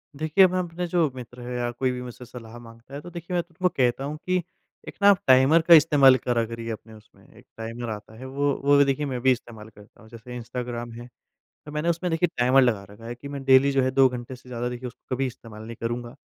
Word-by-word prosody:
देखिए 155 Hz, +6 st, +4 dB
मैं 185 Hz, 0 st, -1 dB
अपने 175 Hz, 0 st, -4 dB
जो 170 Hz, -3 st, +1 dB
मित्र 125 Hz, 0 st, -10 dB
हैं 125 Hz, +1 st, -6 dB
या 120 Hz, 0 st, -1 dB
कोई 130 Hz, +2 st, -1 dB
भी 125 Hz, 0 st, -5 dB
मुझसे 125 Hz, 0 st, -9 dB
सलाह 120 Hz, -1 st, -11 dB
माँगता 115 Hz, +2 st, -15 dB
है 140 Hz, -, -5 dB
तो 175 Hz, -, -10 dB
देखिए 170 Hz, +1 st, -7 dB
मैं 175 Hz, -, +2 dB
तो 170 Hz, +1 st, -29 dB
उनको 180 Hz, +2 st, +1 dB
कहता 125 Hz, 0 st, +1 dB
हूँ 145 Hz, +2 st, -4 dB
कि 185 Hz, 0 st, +1 dB, 0.5 s
एक -, -, -8 dB
ना 200 Hz, -, +7 dB
आप 195 Hz, -3 st, +5 dB
टाइमर 130 Hz, +5 st, +6 dB
का 170 Hz, -, +9 dB
इस्तेमाल 145 Hz, -4 st, +7 dB
करा 120 Hz, -2 st, 0 dB
करिए 115 Hz, 0 st, -7 dB
अपने 110 Hz, 0 st, -9 dB
उसमें। 110 Hz, -1 st, -19 dB
एक -, -, -17 dB
टाइमर 115 Hz, +1 st, -6 dB
आता 110 Hz, 0 st, -8 dB
है, 130 Hz, -, -9 dB
वो 140 Hz, +2 st, 0 dB
वो 140 Hz, 0 st, +5 dB
देखिए 140 Hz, +1 st, 0 dB
मैं 130 Hz, -3 st, -3 dB
भी 130 Hz, +1 st, +4 dB
इस्तेमाल 115 Hz, -3 st, -5 dB
करता 105 Hz, -1 st, -19 dB
हूँ। 110 Hz, -, -17 dB
जैसे 120 Hz, +2 st, -10 dB
इंस्टाग्राम 120 Hz, 0 st, -5 dB
है, 120 Hz, +1 st, -10 dB, 0.6 s
तो 150 Hz, -, -9 dB
मैंने 150 Hz, +3 st, -1 dB
उसमें 170 Hz, +2 st, -1 dB
देखिए 165 Hz, +2 st, +2 dB
टाइमर 125 Hz, +2 st, +4 dB
लगा 115 Hz, -6 st, +1 dB
रखा 105 Hz, +3 st, -14 dB
है 120 Hz, +1 st, -6 dB
कि 125 Hz, +4 st, -10 dB
मैं 140 Hz, -1 st, -6 dB
डेली 135 Hz, +1 st, +5 dB
जो 135 Hz, -1 st, +2 dB
है 130 Hz, -, +1 dB
2 135 Hz, 0 st, +5 dB
घंटे 125 Hz, +1 st, -7 dB
से 125 Hz, 0 st, -17 dB
ज़्यादा 120 Hz, 0 st, -3 dB
देखिए 125 Hz, +1 st, -6 dB
उसको 125 Hz, +1 st, -7 dB
कभी 135 Hz, +1 st, -1 dB
इस्तेमाल 115 Hz, -3 st, -11 dB
नहीं 115 Hz, +1 st, -8 dB
करूँगा। 120 Hz, +2 st, -4 dB
125 Hz, 255 wpm, -25 LUFS, 120-145 Hz, 0.6 s, का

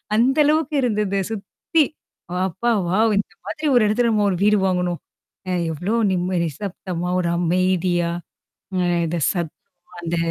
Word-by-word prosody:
அந்த 250 Hz, +6 st, +3 dB
அளவுக்கு 305 Hz, 0 st, +2 dB
இருந்தது 210 Hz, -5 st, 0 dB
சுத்தி. 225 Hz, -, 0 dB, 0.6 s
அப்பா 235 Hz, +7 st, -1 dB, 0.2 s
வாவ்! 220 Hz, +4 st, +3 dB
இந்த 205 Hz, -, -4 dB
மாதிரி 310 Hz, -1 st, -3 dB
ஒரு 240 Hz, -, +6 dB
இடத்துல 235 Hz, +3 st, +2 dB
நம்ம 210 Hz, -2 st, +2 dB
ஒரு 180 Hz, -, -1 dB
வீடு 210 Hz, +1 st, +5 dB
வாங்கணும். 180 Hz, -2 st, 0 dB, 0.5 s
அ -, -, 0 dB, 0.2 s
எவ்ளோ 180 Hz, +8 st, -2 dB, 0.2 s
நிம்ம 180 Hz, +1 st, 0 dB
நிசப்தமா 180 Hz, +1 st, -4 dB
ஒரு 175 Hz, -2 st, 0 dB
அமைதியா 175 Hz, 0 st, +1 dB, 0.7 s
அ -, -, +2 dB, 0.3 s
இத 165 Hz, -, -2 dB, 0.2 s
சத் 170 Hz, -4 st, -3 dB, 0.5 s
அந்த 170 Hz, 0 st, -2 dB
190 Hz, 140 wpm, -22 LUFS, 175-225 Hz, 0.7 s, ஒரு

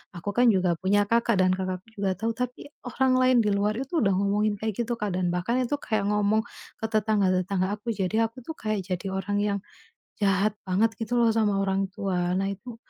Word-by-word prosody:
Aku 175 Hz, +4 st, -5 dB
kan 245 Hz, 0 st, +5 dB
juga 180 Hz, -2 st, +2 dB
punya 205 Hz, +2 st, +3 dB
kakak 230 Hz, -3 st, +2 dB
dan 185 Hz, 0 st, +4 dB
kakakku 185 Hz, -1 st, -4 dB, 0.2 s
juga 195 Hz, -2 st, +1 dB
tahu, 225 Hz, +2 st, -1 dB
tapi 250 Hz, +3 st, -4 dB, 0.2 s
orang 260 Hz, +1 st, +1 dB
lain 255 Hz, -1 st, +4 dB
di 210 Hz, -, +1 dB
luar 205 Hz, +2 st, +1 dB
itu 270 Hz, +6 st, -3 dB
udah 195 Hz, -1 st, +3 dB
ngomongin 205 Hz, +2 st, +1 dB
kayak 220 Hz, -2 st, -3 dB
gitu, 240 Hz, 0 st, -2 dB
Kak, 205 Hz, -4 st, -2 dB
dan 175 Hz, -1 st, 0 dB
bahkan 210 Hz, +8 st, 0 dB
itu 250 Hz, -, -3 dB
kayak 210 Hz, -2 st, -1 dB
ngomong 210 Hz, +1 st, +2 dB, 0.4 s
ke 220 Hz, -, -3 dB
tetangga-tetangga 200 Hz, -3 st, +1 dB
aku, 215 Hz, +3 st, -7 dB
jadi 215 Hz, +3 st, +1 dB
aku 255 Hz, +3 st, -13 dB
tuh 320 Hz, -, -5 dB
kayak 215 Hz, -4 st, -2 dB
jadi 185 Hz, +1 st, -3 dB
orang 195 Hz, +2 st, -2 dB
yang 200 Hz, -1 st, 0 dB, 0.6 s
jahat 200 Hz, +1 st, +3 dB, 0.2 s
banget 220 Hz, +5 st, +2 dB
gitu 225 Hz, +2 st, -1 dB
loh 230 Hz, -1 st, +4 dB
sama 205 Hz, -3 st, +2 dB
orang 195 Hz, 0 st, 0 dB
tua. 185 Hz, -4 st, -1 dB
Nah 195 Hz, 0 st, 0 dB
itu 225 Hz, +4 st, -8 dB
205 Hz, 205 wpm, -26 LUFS, 190-225 Hz, 0.6 s, kan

